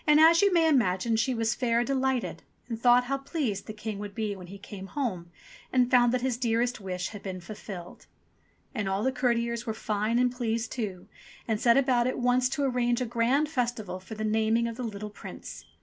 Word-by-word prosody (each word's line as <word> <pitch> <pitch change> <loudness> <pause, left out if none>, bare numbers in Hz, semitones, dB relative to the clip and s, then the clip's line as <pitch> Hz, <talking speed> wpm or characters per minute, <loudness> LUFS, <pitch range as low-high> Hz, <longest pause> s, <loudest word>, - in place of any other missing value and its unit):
As 320 +3 +7
you 400 -1 +4
may 335 -2 +4
imagine 230 -6 +2
she 245 +3 +1
was 225 0 +1
fair 235 -1 +1
delighted, 265 -1 -1 0.3
and 230 -2 -5
thought 245 0 +6
how 275 +2 -2
pleased 270 - -3
the - - -4
King 210 -1 -5
would 205 0 -7
be 215 -3 -2
when 180 -2 -10
he 195 +3 -9
came 195 0 -9
home 195 -11 -3 0.4
and 250 -1 +3
found 245 -1 +5
that 255 0 0
his 255 -2 0
dearest 235 -1 0
wish 180 -2 -3
had 205 - -9
been 185 -2 -5
fulfilled. 180 -1 -9 0.7
And 210 -6 -2
all 195 +2 0
the 265 - +2
courtiers 235 -2 0
were 220 - -2
fine 215 +2 0
and 250 0 +3
pleased 230 -2 -2
too, 200 -7 -4 0.4
and 220 -2 0
set 235 0 +5
about 255 -3 +3
at 255 - -1
once 250 0 +2
to 280 +2 -1
arrange 245 -2 +1
a 250 - 0
grand 240 +6 +2
festival 235 - -2
for 190 +4 -9
the 215 - -4
naming 220 +2 +2
of 230 - -5
the 255 - -6
little 210 -2 -5
Prince. - - -9
235 Hz, 210 wpm, -28 LUFS, 210-250 Hz, 0.7 s, As